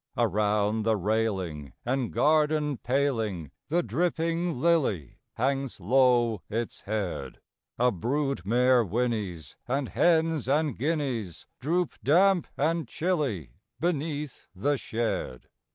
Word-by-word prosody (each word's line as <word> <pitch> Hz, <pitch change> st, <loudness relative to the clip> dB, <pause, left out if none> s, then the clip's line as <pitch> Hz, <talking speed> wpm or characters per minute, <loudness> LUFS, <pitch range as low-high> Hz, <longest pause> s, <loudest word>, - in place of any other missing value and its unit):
Around 105 Hz, -1 st, +1 dB
the 110 Hz, 0 st, +2 dB
railing 95 Hz, -, -1 dB
and 125 Hz, -1 st, -1 dB
garden 150 Hz, -2 st, +2 dB
paling 115 Hz, -, -1 dB, 0.2 s
The 170 Hz, +3 st, +1 dB
dripping 165 Hz, -, -1 dB
lily 135 Hz, -, +1 dB, 0.2 s
hangs 135 Hz, 0 st, -1 dB
low 120 Hz, 0 st, +3 dB
its 115 Hz, +2 st, -3 dB
head: 95 Hz, -11 st, -3 dB, 0.4 s
A 125 Hz, +1 st, +3 dB
brood 135 Hz, -, -1 dB
mare 125 Hz, +4 st, +4 dB
whinnies; 105 Hz, -, -2 dB
and 135 Hz, +1 st, -1 dB
hens 160 Hz, -5 st, +2 dB
and 150 Hz, -2 st, +2 dB
guineas 130 Hz, -, -2 dB
Droop, 170 Hz, +5 st, 0 dB
damp 180 Hz, +3 st, +4 dB
and 160 Hz, 0 st, 0 dB
chilly, 130 Hz, -, -2 dB, 0.2 s
beneath 150 Hz, -3 st, -2 dB
the 145 Hz, +10 st, +1 dB
shed. 115 Hz, -, -3 dB
125 Hz, 105 wpm, -28 LUFS, 105-150 Hz, 0.4 s, mare